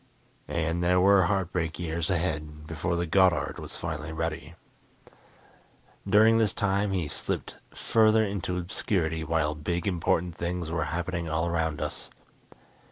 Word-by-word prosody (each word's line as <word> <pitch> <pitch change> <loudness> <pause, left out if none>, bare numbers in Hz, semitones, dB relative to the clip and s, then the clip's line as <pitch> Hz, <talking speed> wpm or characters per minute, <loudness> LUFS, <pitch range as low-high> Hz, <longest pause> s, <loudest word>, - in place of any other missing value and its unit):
And 85 +1 -1
there 90 +1 +4
were 95 0 +5
heartbreak 90 -4 -1
years 85 0 -2
ahead 75 -4 -2
before 80 +2 -2
the 85 0 0
Goddard 90 -1 +2
was - - -7
finally 80 -1 -5
ready. 80 -1 -4 1.5
During 110 +3 +6
this 110 -3 +2
time 100 0 0
he 90 -5 -1
slipped - - -4 0.2
further 110 -1 +3
into 95 -2 -3
obscurity 85 -2 -1
while 80 -1 0
big, 85 +3 -3
important 90 -2 0
things 85 -1 -3
were 80 -3 0
happening 85 +2 -3
all 80 +1 0
around 80 -3 -1
us. - - -6
85 Hz, 135 wpm, -27 LUFS, 80-95 Hz, 1.5 s, During